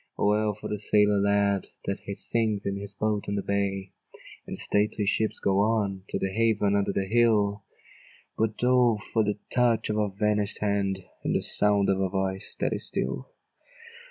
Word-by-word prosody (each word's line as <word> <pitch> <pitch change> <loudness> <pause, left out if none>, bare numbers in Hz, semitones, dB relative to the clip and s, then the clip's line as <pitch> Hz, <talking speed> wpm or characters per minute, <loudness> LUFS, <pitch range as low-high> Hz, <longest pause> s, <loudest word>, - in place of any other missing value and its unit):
O, - - 0
well 105 0 +2
for 105 - -7
the 105 - -3
sailor 105 0 +3
lad, 100 -1 +1 0.2
That 100 - -2
he 100 - -6
sings 110 -3 0
in 100 - -1
his 100 0 -7
boat 105 0 -1
on 100 - -1
the 100 - -2
bay! 100 -1 -2 0.6
And - - -5
the - - -4
stately 105 0 +1
ships 110 +2 0
go 95 0 +1
on 100 -3 0
To - - -1
their 95 0 -2
haven 105 -2 +2
under 100 -1 +1
the 95 - -1
hill; 105 -2 +2 0.7
But 110 +1 -1
O 125 -3 +4
for 110 +1 -1
the 105 0 -1 0.2
touch 120 -3 +2
of 105 - -1
a 105 -1 +1
vanish'd 105 0 0
hand, 100 -2 -1 0.2
And - - 0
the - - +1
sound 100 -1 +2
of 95 0 0
a 95 - +1
voice 95 0 -2
that - - 0
is - - -2
still! - - -3
100 Hz, 190 wpm, -27 LUFS, 100-110 Hz, 0.7 s, O